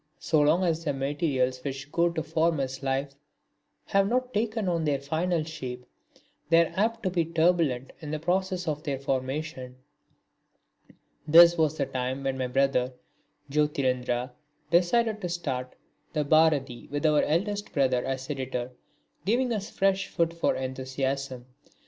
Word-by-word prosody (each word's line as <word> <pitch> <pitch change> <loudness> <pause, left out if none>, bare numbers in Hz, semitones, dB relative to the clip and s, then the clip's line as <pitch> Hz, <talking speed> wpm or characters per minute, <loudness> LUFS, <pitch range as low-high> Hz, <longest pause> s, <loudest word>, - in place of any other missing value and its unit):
So 155 -2 +2
long 155 +5 +3
as 165 -2 0
the 145 -3 -1
materials 135 -2 -1
which 140 0 -5
go 170 0 +3
to 160 -2 -3
form 160 +1 +1
his 135 -1 -3
life 135 +1 -1 0.7
have 195 0 +2
not 255 +1 0
taken 215 -1 -1
on 170 -2 0
their 145 -2 +1
final 160 +4 -1
shape 130 -6 -7 0.6
they 170 0 +6
are - - -8
apt 225 +3 0
to 185 - 0
be 175 -2 +1
turbulent 160 -5 +1
in 155 - -7
the 155 - -2
process 180 +2 -1
of 150 -1 -1
their 145 -4 -2
formation. 130 0 -3 1.5
This 170 +2 +8
was 155 -2 +1
the - - +1
time 130 +1 -3
when 135 -1 -1
my 130 -1 -2
brother 130 -1 +1 0.6
Jyotirindra 130 -4 0 0.4
decided 215 +6 +2
to 180 - -3
start 130 -7 -3 0.4
the 150 -2 +1
Bharati 145 -5 +2
with 145 +2 -3
our 150 -1 +4
eldest 205 +6 -1
brother 130 -3 +2
as 135 0 -3
editor, 130 -3 -3 0.5
giving 240 +4 +1
us 205 -2 -3
fresh 195 0 +1
food 170 0 0
for 170 - 0
enthusiasm. 130 0 -3
150 Hz, 150 wpm, -27 LUFS, 135-170 Hz, 1.5 s, This